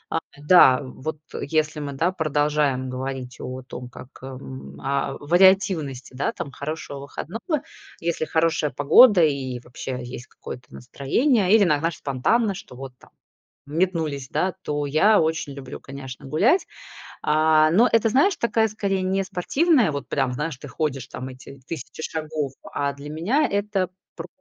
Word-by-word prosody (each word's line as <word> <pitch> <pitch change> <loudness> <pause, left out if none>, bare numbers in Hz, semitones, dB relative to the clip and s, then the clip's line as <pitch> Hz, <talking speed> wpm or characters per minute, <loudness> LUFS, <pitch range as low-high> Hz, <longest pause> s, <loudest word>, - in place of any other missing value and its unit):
А, - - +3 0.3
да, 145 -6 +7
вот 140 +4 -6 0.2
если 155 0 0
мы, 145 -1 -4
да, 165 +6 +1
продолжаем 150 -5 0
говорить 130 -1 -5
о 130 +1 -6
том, 125 -1 -8
как, 125 +1 -12
м, 70 - -9
о 140 - -1
вариативности, 175 -5 +3
да, 130 +2 -1
там 140 - -6
хорошего 145 0 -6
выходного. 225 - -4 0.4
Если 165 -1 -1
хорошая 160 -1 +1
погода, 175 - +6
и 135 -5 0
вообще 125 +1 -6
есть 125 +1 -8
какое-то 125 0 -10
настроение, 190 - +1
или 220 - +6
на 150 -6 +3
знаешь, 165 -2 -1
спонтанно, 195 - +1
что 180 -8 -11
вот 135 0 -8
там - - -20 0.6
метнулись, 155 -4 -1
да, 185 - 0
то 145 -3 -2
я 155 +10 +4
очень 160 -2 -1
люблю, 135 -2 -8
конечно, 135 -1 -9
гулять. 215 - +3 0.6
А, 155 0 +4
но 225 +9 +5
это, 230 0 +4
знаешь, 290 - +3
такая 225 -1 +2
скорее 200 -2 -1
не 190 +1 0
спортивная 250 - +2
вот 140 -1 -5
прям, 135 -3 0
знаешь, 150 +2 -3
ты 145 - -10
ходишь 135 -5 -2
там 130 - -7
эти 130 +1 -11
тысячи 145 -2 -7
шагов, 155 -3 -3 0.2
а 140 0 -1
для 140 +1 -9
меня 205 - +1
это 200 -2 -1 0.3
про - - -7
150 Hz, 155 wpm, -24 LUFS, 135-185 Hz, 0.6 s, да